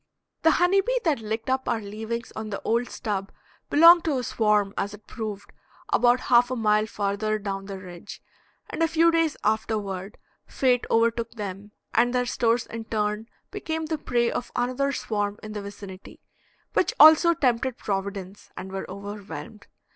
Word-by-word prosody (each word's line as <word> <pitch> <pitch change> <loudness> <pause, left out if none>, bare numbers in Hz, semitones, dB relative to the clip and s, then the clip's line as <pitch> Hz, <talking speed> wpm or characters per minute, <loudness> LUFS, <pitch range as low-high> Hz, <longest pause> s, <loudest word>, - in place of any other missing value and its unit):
The 325 - +5
honey 355 +3 +4
bee - - 0
that 310 -7 +1
licked 220 +1 -4
up 260 0 0
our 230 - +1
leavings 220 +3 -6
on 220 0 -5
the 200 - -4
old 235 +2 0
stub 200 -4 -4 0.4
belonged 335 +3 +8
to 300 -5 +1
a 250 - -2
swarm, 210 -3 +1
as 205 +1 -3
it 210 +1 -20
proved, 215 -4 -6 0.4
about 245 +1 +4
half 245 0 +4
a 255 - -2
mile 215 -2 +2
farther 210 +1 -1
down 195 -2 -5
the 195 -1 -6
ridge, 180 +1 -10 0.5
and - - -5
a 330 - +4
few 330 +1 +4
days 330 -2 +1
afterward 210 -2 -2 0.3
fate 250 -2 +1
overtook 230 0 +1
them, 205 -2 -6 0.2
and 245 +2 +3
their 250 0 +2
stores 235 -1 +1
in 230 0 -7
turn 210 0 -2 0.2
became 320 -1 -3
the 315 -1 -3
prey 240 -3 0
of 245 - -4
another 255 +3 0
swarm 205 -5 -2
in 215 - -7
the 210 - -4
vicinity, 200 -1 -10 0.5
which - - +1
also 315 +2 +8
tempted 250 -2 0
Providence 195 -1 -5
and 190 - -7
were 195 0 -5
overwhelmed. 200 -2 -8
220 Hz, 170 wpm, -25 LUFS, 205-250 Hz, 0.5 s, belonged